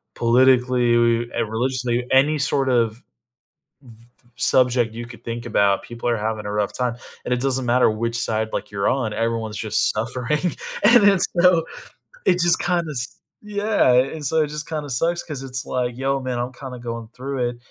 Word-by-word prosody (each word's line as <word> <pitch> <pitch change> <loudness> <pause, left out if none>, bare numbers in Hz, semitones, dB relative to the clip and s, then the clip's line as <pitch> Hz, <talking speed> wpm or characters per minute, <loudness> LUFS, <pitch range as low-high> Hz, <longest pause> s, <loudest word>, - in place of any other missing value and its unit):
politically, 120 -1 +3
and - - -1
religiously, 125 0 -1
any 145 +3 +4
sort 135 -1 0
of 115 -3 +2
v 125 - -21 1.3
subject 125 -3 +2
you 120 +1 -7
could 120 -1 -13
think 120 +1 -5
about, 100 -3 +2
people 120 0 -6
are 120 - +2
having 110 0 -3
a 105 - -3
rough 105 -1 -1
time, 125 -2 -1 0.3
and 125 - 0
it 125 - 0
doesn't 130 -1 0
matter 125 0 +4
which 115 +2 -2
side, 110 -1 -1
like, 105 - -3
you're 100 -1 -1
on, 125 -5 0
everyone's 115 -1 -2
just 110 -1 0
suffering, 125 +9 -2 0.3
and 235 0 +7
it's 195 -2 +2 0.2
so 175 -2 +5 0.6
it 180 - +3
just 175 -1 +3
kinda 175 -2 0
s 125 -3 -5 0.2
yeah, 210 - +1
and 135 +5 +1
so 160 +4 +1
it 150 - +1
just 150 +1 -6
kinda 150 -3 -4
sucks 170 +7 0
'cause 145 -4 -7
it's 130 -2 -5
like, 125 -1 -2
"Yo, 135 +1 -1
man, 125 -2 -3
I'm 125 +1 -3
kinda 125 -1 -8
going 115 -2 -6
through 130 -1 -2
it," 120 - -9
125 Hz, 185 wpm, -22 LUFS, 115-140 Hz, 1.3 s, and